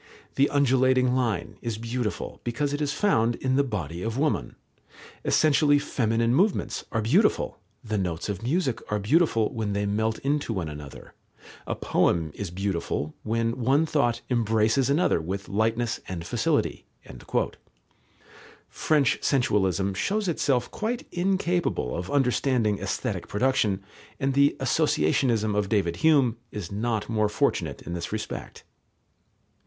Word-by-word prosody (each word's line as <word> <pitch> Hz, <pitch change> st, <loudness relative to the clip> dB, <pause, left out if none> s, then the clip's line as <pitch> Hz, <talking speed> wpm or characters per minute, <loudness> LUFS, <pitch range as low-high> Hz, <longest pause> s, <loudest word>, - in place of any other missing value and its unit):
The 140 Hz, +1 st, +3 dB
undulating 130 Hz, -2 st, +3 dB
line 115 Hz, -9 st, -1 dB
is 115 Hz, -2 st, -3 dB
beautiful, 115 Hz, -1 st, -4 dB
because 140 Hz, +5 st, -1 dB
it 145 Hz, -, -2 dB
is 145 Hz, -1 st, 0 dB
found 120 Hz, -, +2 dB
in 130 Hz, +2 st, -1 dB
the 140 Hz, -, +4 dB
body 90 Hz, -, -4 dB
of 115 Hz, +4 st, -3 dB
woman; 150 Hz, +2 st, 0 dB, 0.7 s
essentially 145 Hz, -1 st, +4 dB
feminine 115 Hz, -4 st, 0 dB
movements 190 Hz, +8 st, +1 dB
are 115 Hz, -1 st, 0 dB
beautiful; 175 Hz, -, +2 dB, 0.2 s
the 110 Hz, -3 st, -2 dB
notes 85 Hz, -4 st, -2 dB
of 100 Hz, -3 st, -4 dB
music 130 Hz, +1 st, 0 dB
are 105 Hz, -, +2 dB
beautiful, 115 Hz, -, +2 dB
when 110 Hz, -3 st, -2 dB
they 100 Hz, 0 st, 0 dB
melt 110 Hz, +2 st, 0 dB
into 140 Hz, -3 st, 0 dB
one 90 Hz, -6 st, -3 dB
another; 75 Hz, -2 st, -10 dB, 0.5 s
a -, -, -1 dB
poem 80 Hz, -2 st, +1 dB
is 100 Hz, -3 st, -5 dB
beautiful, 85 Hz, -5 st, -2 dB
when 115 Hz, +2 st, -1 dB
one 135 Hz, +6 st, +3 dB
thought 120 Hz, -7 st, +1 dB
embraces 115 Hz, +2 st, +2 dB
another 150 Hz, -, +2 dB
with 95 Hz, +5 st, -4 dB
lightness 115 Hz, +3 st, 0 dB
and 85 Hz, -3 st, -5 dB
facility." -, -, 0 dB, 1.8 s
French 150 Hz, -5 st, +1 dB
sensualism 100 Hz, -, +1 dB
shows 200 Hz, -, -1 dB
itself 135 Hz, -7 st, 0 dB
quite 235 Hz, +3 st, -3 dB
incapable 180 Hz, -, 0 dB
of 90 Hz, +1 st, -4 dB
understanding 125 Hz, -5 st, +1 dB
aesthetic -, -, -3 dB
production, 105 Hz, -4 st, +1 dB, 0.4 s
and 135 Hz, 0 st, 0 dB
the 140 Hz, +1 st, +4 dB
associationism 115 Hz, -, +1 dB
of 105 Hz, -1 st, 0 dB
David 90 Hz, -6 st, +1 dB
Hume 135 Hz, -, +3 dB
is 100 Hz, -4 st, -6 dB
not 110 Hz, +1 st, -1 dB
more 110 Hz, -2 st, +1 dB
fortunate 105 Hz, -, -1 dB
in 85 Hz, -, -6 dB
this 85 Hz, -1 st, -4 dB
respect. -, -, -6 dB
115 Hz, 135 wpm, -26 LUFS, 100-140 Hz, 1.8 s, the